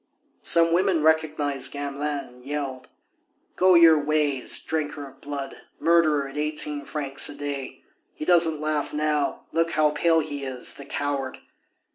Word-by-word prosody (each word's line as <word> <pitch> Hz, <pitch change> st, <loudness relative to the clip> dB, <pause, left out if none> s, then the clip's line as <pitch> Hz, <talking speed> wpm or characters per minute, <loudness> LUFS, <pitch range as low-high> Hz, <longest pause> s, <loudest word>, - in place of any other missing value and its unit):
Some 165 Hz, 0 st, +4 dB
women 180 Hz, -3 st, +1 dB
recognized 155 Hz, -3 st, +1 dB
Gamelin 145 Hz, 0 st, -4 dB
and 125 Hz, 0 st, -18 dB
yelled: 135 Hz, -2 st, -5 dB, 0.7 s
"Go 185 Hz, 0 st, +4 dB
your 165 Hz, -3 st, +6 dB
ways, 145 Hz, -3 st, +2 dB
drinker 150 Hz, -2 st, -4 dB
of 135 Hz, 0 st, -18 dB
blood! 140 Hz, -1 st, -7 dB, 0.2 s
murderer 155 Hz, -4 st, +2 dB
at 140 Hz, +2 st, -7 dB
eighteen 150 Hz, -1 st, -2 dB
francs 140 Hz, -2 st, +1 dB
a 145 Hz, -, -8 dB
day!... 140 Hz, -2 st, -6 dB, 0.3 s
He -, -, -6 dB
doesn't 165 Hz, -3 st, +4 dB
laugh 155 Hz, -1 st, -2 dB
now; 150 Hz, -1 st, -1 dB
look 165 Hz, +1 st, 0 dB
how 155 Hz, -1 st, +2 dB
pale 165 Hz, +2 st, +2 dB
he 145 Hz, -2 st, -6 dB
is, 130 Hz, -2 st, +1 dB
the 140 Hz, -, -10 dB
coward!" 140 Hz, -2 st, -3 dB
150 Hz, 145 wpm, -24 LUFS, 140-160 Hz, 0.7 s, your